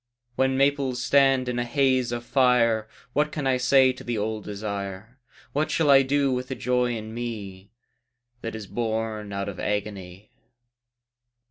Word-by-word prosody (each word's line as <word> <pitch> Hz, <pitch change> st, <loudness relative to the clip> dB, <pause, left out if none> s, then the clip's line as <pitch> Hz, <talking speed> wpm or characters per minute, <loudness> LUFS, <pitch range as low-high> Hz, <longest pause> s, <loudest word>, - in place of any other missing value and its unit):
When 130 Hz, +1 st, +1 dB
maples 140 Hz, -2 st, +1 dB
stand 135 Hz, 0 st, +3 dB
in 125 Hz, 0 st, -1 dB
a -, -, +1 dB
haze 130 Hz, -1 st, +1 dB
of 120 Hz, 0 st, -4 dB
fire 115 Hz, -4 st, +3 dB, 0.3 s
What 150 Hz, +2 st, +1 dB
can 150 Hz, -, -4 dB
I 130 Hz, -1 st, +2 dB
say 130 Hz, +1 st, +4 dB
to 125 Hz, -, -11 dB
the 120 Hz, -2 st, -2 dB
old 110 Hz, 0 st, -3 dB
desire, 100 Hz, +2 st, -6 dB, 0.3 s
What 150 Hz, +2 st, 0 dB
shall 155 Hz, -3 st, +3 dB
I 135 Hz, 0 st, +8 dB
do 140 Hz, 0 st, +1 dB
with 125 Hz, 0 st, -2 dB
the 130 Hz, -, -4 dB
joy 125 Hz, +1 st, 0 dB
in 110 Hz, 0 st, -8 dB
me 105 Hz, -5 st, -6 dB, 0.7 s
That 115 Hz, -, -5 dB
is 110 Hz, -2 st, -6 dB
born 110 Hz, -1 st, -3 dB
out 100 Hz, 0 st, -3 dB
of 100 Hz, -2 st, -6 dB
agony? 100 Hz, -2 st, -4 dB
120 Hz, 160 wpm, -25 LUFS, 105-130 Hz, 0.7 s, I